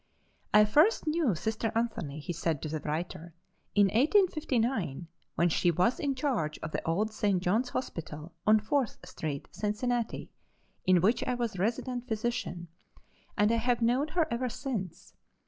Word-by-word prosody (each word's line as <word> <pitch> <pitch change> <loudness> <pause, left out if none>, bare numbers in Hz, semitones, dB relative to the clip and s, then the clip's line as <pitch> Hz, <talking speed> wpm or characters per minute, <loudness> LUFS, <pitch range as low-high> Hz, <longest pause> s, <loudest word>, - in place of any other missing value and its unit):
"I 210 0 +7
first 305 - +4
knew 305 - +1
Sister 220 +5 -2
Anthony," 225 -11 -2
he 175 +4 -4
said 165 -2 -1
to 155 - -3
the 155 +1 -2
writer, 165 +2 -4 0.4
"in 205 -1 +6
1859, 245 - +1 0.3
when 170 - +3
she 175 +1 +2
was 180 +9 +2
in 280 -3 0
charge 245 - -1
of 155 - -4
the - - -3
old 210 +6 0
St. 205 -3 +1
John's 215 +8 +1
Hospital, 165 -10 -5
on 215 0 +7
Fourth 245 +3 0
street, 150 -5 -5
Cincinnati, 230 +3 -2 0.6
in 185 -2 +5
which 225 +6 +3
I 250 - 0
was 235 -6 -3
resident 240 +4 -1
physician, 220 -6 -2 0.7
and 210 +1 +4
I 230 - +3
have 240 +1 +1
known 250 +6 +2
her 330 - +4
ever 250 +2 -1
since. 225 - -5
215 Hz, 155 wpm, -30 LUFS, 175-245 Hz, 0.7 s, I